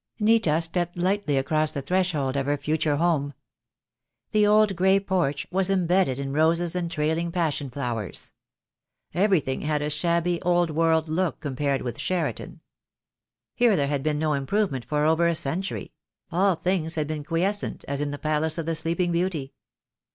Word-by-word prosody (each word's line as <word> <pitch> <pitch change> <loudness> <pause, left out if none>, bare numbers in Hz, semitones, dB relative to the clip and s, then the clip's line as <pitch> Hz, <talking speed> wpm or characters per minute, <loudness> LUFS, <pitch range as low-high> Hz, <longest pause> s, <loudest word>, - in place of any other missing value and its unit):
Nita 210 -8 +3
stepped 175 +1 -2
lightly 185 -4 0
across 155 +3 +1
the 140 - -4
threshold 170 -7 0
of 140 0 -1
her 145 0 +1
future 150 0 0
home. 145 -3 0 1.0
The 210 -1 +4
old 210 -1 +4
grey 190 +2 +4
porch 175 -8 -1
was 190 +1 +1
embedded 180 -7 +2
in 135 0 -4
roses 165 +3 +2
and 175 -2 -2
trailing 160 +1 -1
passion 160 -5 -1
flowers. 120 -7 -5 0.8
Everything 175 -7 +1
had 150 -1 -1
a 150 - -2
shabby, 170 +2 0
old 175 -1 +2
world 160 0 +2
look 170 +2 -1
compared 140 -1 -1
with 120 - -5
Cheriton. 185 -2 -3 0.9
Here 240 -4 +3
there 145 - +1
had 145 -2 -1
been 150 +1 0
no 155 0 0
improvement 140 - -1
for 150 0 0
over 160 +2 +3
a 170 - +1
century; 170 +5 -3 0.4
all 185 +2 +3
things 170 -2 -1
had 155 -2 0
been 150 0 -4
quiescent 185 +7 -1
as 140 0 -2
in 145 - -1
the 145 - -5
Palace 155 +1 0
of 165 - -3
the 165 - -1
Sleeping 165 +2 0
Beauty. 170 -6 -1
160 Hz, 165 wpm, -25 LUFS, 145-180 Hz, 1.0 s, The